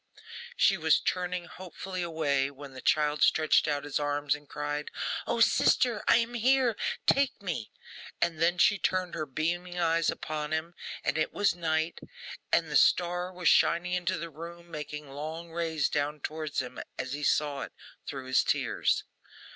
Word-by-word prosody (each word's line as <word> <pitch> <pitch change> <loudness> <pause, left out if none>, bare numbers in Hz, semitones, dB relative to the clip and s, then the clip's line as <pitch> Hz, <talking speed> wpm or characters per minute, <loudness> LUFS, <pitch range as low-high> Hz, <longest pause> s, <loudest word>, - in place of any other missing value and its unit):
She - - +4
was - - +4
turning 180 -1 -2
hopefully 185 +1 -7
away, 150 -5 0
when 140 -1 -11
the 130 - -9
child 150 -1 +2
stretched 155 0 +4
out 145 -1 -1
his 145 0 -2
arms, 145 -1 0
and 145 -1 -9
cried, 150 0 -3 0.4
'O, 235 0 0
sister, 230 -1 +3
I - - +7
am 235 0 -1
here! 250 0 +3 0.3
Take 275 -1 +3
me!' 170 - -4 0.5
and 165 -2 0
then 175 +2 +3
she 205 +3 +4
turned 185 0 0
her 155 - -3
beaming 175 +5 -2
eyes 165 -1 +2
upon 150 -1 -3
him, 160 +2 -2 0.3
and 135 +4 0
it 155 - 0
was 205 - +2
night; 160 -1 -1 0.5
and - - +2
the - - -1
star 180 +1 +3
was 180 -2 -3
shining 175 +2 +4
into 180 +1 0
the 170 +1 -6
room, 170 +2 -10
making 150 -1 -6
long 155 +4 -6
rays 160 -3 0
down 150 +1 -1
towards 155 +1 -3
him 125 - -8 0.2
as 130 +1 -4
he 145 - -4
saw 145 -1 +1
it - - -7 0.3
through 135 -2 -5
his 130 0 +3
tears. - - +1
160 Hz, 170 wpm, -29 LUFS, 150-180 Hz, 0.5 s, I